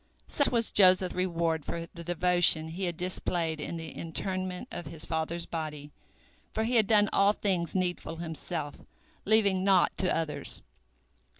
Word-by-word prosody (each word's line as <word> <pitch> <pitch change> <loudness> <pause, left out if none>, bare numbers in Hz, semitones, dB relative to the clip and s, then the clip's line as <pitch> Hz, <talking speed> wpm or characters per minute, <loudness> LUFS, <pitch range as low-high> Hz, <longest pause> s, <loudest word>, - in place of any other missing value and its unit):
Such 285 - +3
was 230 -2 +1
Joseph's 185 -2 +5
reward 170 -3 -1
for 170 +2 -5
the 170 - -8
devotion 175 -2 +3
he 180 +4 -4
had 175 -2 -3
displayed 170 -3 -1
in 170 - -5
the 165 -1 -7
interment 185 +4 -3
of 170 - -6
his 160 0 -4
father's 165 +1 -2
body, 150 -3 -6 0.6
for 220 - -1
he 240 +2 +2
had 215 -3 +3
done 210 -2 +4
all 200 +1 +4
things 185 -5 -1
needful 175 -3 -2
himself, 160 -2 -5 0.4
leaving 200 -3 +3
naught 190 -2 +3
to 185 - +1
others. 160 -2 -2
175 Hz, 155 wpm, -29 LUFS, 165-190 Hz, 0.6 s, Joseph's